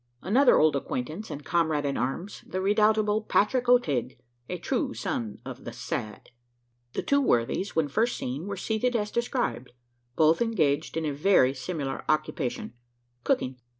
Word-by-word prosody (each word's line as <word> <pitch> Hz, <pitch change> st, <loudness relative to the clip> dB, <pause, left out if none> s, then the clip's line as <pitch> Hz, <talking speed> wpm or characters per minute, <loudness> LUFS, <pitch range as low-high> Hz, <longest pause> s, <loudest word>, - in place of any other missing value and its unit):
Another 245 Hz, -, +5 dB
old 155 Hz, -1 st, +4 dB
acquaintance 155 Hz, -, -4 dB
and 145 Hz, 0 st, -7 dB
comrade 160 Hz, -4 st, +1 dB
in 140 Hz, -1 st, -1 dB
arms 150 Hz, +11 st, -3 dB
the 185 Hz, -, -3 dB
redoubtable 210 Hz, +2 st, +3 dB
Patrick 245 Hz, +4 st, +1 dB
O'Tigg 140 Hz, -, +2 dB, 0.3 s
a -, -, -3 dB
true -, -, -2 dB
son 110 Hz, -3 st, -3 dB
of -, -, -8 dB
the -, -, -6 dB
"Sad." 105 Hz, +3 st, -5 dB, 0.6 s
The -, -, -2 dB
two 280 Hz, 0 st, +3 dB
worthies, 155 Hz, -, 0 dB
when 160 Hz, -2 st, +2 dB
first 225 Hz, -, 0 dB
seen, 140 Hz, +9 st, -4 dB
were 200 Hz, -1 st, -4 dB
seated 225 Hz, +5 st, -1 dB
as 210 Hz, -2 st, -1 dB
described 235 Hz, -, -2 dB, 0.4 s
both 160 Hz, +3 st, +4 dB
engaged 165 Hz, -11 st, +1 dB
in 160 Hz, -, -1 dB
a 150 Hz, -, -1 dB
very 140 Hz, -4 st, +4 dB
similar 140 Hz, -1 st, -4 dB
occupation 155 Hz, -5 st, -1 dB, 0.5 s
cooking. 130 Hz, 0 st, 0 dB
165 Hz, 150 wpm, -27 LUFS, 140-215 Hz, 0.6 s, Another